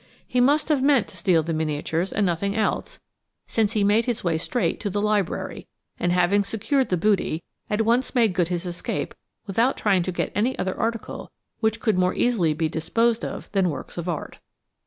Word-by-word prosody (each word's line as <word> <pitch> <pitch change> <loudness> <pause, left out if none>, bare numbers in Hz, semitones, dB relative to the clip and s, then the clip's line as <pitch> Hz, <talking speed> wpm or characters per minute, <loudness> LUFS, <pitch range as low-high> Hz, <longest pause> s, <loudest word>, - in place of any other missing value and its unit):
He 250 - +1
must 290 +5 +3
have 295 -4 +3
meant 275 -5 +4
to - - -13
steal 170 -2 +2
the 165 +1 -2
miniatures 160 +3 -1
and 205 - +1
nothing 195 +3 0
else, 220 -1 -1 0.5
since 220 -1 0
he 210 -3 +2
made 210 +3 +3
his 240 -3 -1
way 165 -3 +1
straight 245 +8 -1
to 205 - -2
the 205 +2 -1
library, 210 -3 -1 0.3
and, 175 - +1
having 180 +3 +3
secured 235 +6 0
the 180 - +1
booty, 175 -3 +1 0.3
at 210 +1 +1
once 245 +4 +1
made 230 -6 +4
good 175 -2 +1
his 175 0 -3
escape 175 0 -3 0.3
without 230 +6 +1
trying 195 -4 +2
to 185 - -2
get 180 - -2
any 235 +6 0
other 190 0 -2
article 230 0 -3 0.3
which 220 0 +1
could 220 -5 +1
more 180 0 +2
easily 185 -11 +2
be 160 0 0
disposed 230 +9 0
of - - -6
than 195 -3 +2
works 150 - -6
of 175 +1 -4
art. 165 - -5
200 Hz, 200 wpm, -24 LUFS, 175-230 Hz, 0.5 s, meant